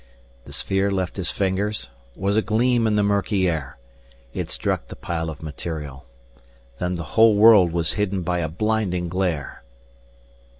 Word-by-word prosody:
The -, -, -12 dB
sphere 95 Hz, +1 st, 0 dB
left 95 Hz, -2 st, -2 dB
his 90 Hz, -3 st, +2 dB
fingers, 100 Hz, -4 st, -1 dB, 0.2 s
was 100 Hz, +1 st, 0 dB
a 110 Hz, -, +4 dB
gleam 115 Hz, +1 st, +2 dB
in 105 Hz, -, +1 dB
the 105 Hz, -, +3 dB
murky 100 Hz, -1 st, +1 dB
air. 75 Hz, -7 st, -3 dB, 0.6 s
It -, -, -4 dB
struck -, -, -2 dB
the -, -, -9 dB
pile 80 Hz, -1 st, -3 dB
of 80 Hz, 0 st, -9 dB
material. 75 Hz, -3 st, -6 dB, 0.7 s
Then 90 Hz, 0 st, -1 dB
the 85 Hz, -, -4 dB
whole 110 Hz, -1 st, +6 dB
world 105 Hz, -5 st, +7 dB
was 85 Hz, -1 st, 0 dB
hidden 100 Hz, -3 st, -1 dB
by 90 Hz, 0 st, -1 dB
a 80 Hz, -2 st, -2 dB
blinding 95 Hz, -2 st, -1 dB
glare. 90 Hz, -6 st, -2 dB
95 Hz, 160 wpm, -23 LUFS, 85-105 Hz, 0.7 s, world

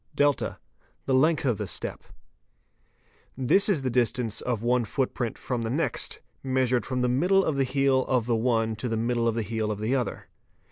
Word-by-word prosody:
| -, -, -17 dB
(8) 145 Hz, -1 st, +3 dB, 0.6 s
The 135 Hz, -, 0 dB
length 155 Hz, +3 st, +3 dB
of 120 Hz, -6 st, +1 dB
the -, -, -3 dB
step. -, -, -4 dB
_ -, -, -28 dB, 1.3 s
This 155 Hz, -, +4 dB
is 160 Hz, -9 st, +1 dB
the 130 Hz, -, -1 dB
distance 120 Hz, -2 st, 0 dB
of 120 Hz, -3 st, -2 dB
one 125 Hz, 0 st, +2 dB
footprint 120 Hz, 0 st, -2 dB
from 125 Hz, -2 st, -3 dB
the 115 Hz, -, -2 dB
next, 145 Hz, +8 st, -2 dB, 0.2 s
measured 130 Hz, -2 st, 0 dB
from 125 Hz, -1 st, -1 dB
the -, -, +2 dB
middle 180 Hz, +10 st, +3 dB
of 155 Hz, -, 0 dB
the 135 Hz, -, +2 dB
heel 135 Hz, 0 st, +2 dB
of 125 Hz, -4 st, +1 dB
the 120 Hz, -1 st, +1 dB
one 115 Hz, -1 st, +1 dB
to 120 Hz, +4 st, -3 dB
the 115 Hz, -, -1 dB
middle 115 Hz, +1 st, 0 dB
of 115 Hz, -, 0 dB
the 115 Hz, -, -1 dB
heel 110 Hz, +1 st, -2 dB
of 105 Hz, -, -3 dB
the 110 Hz, +5 st, -1 dB
other. 125 Hz, -3 st, -3 dB
125 Hz, 205 wpm, -26 LUFS, 115-135 Hz, 1.3 s, This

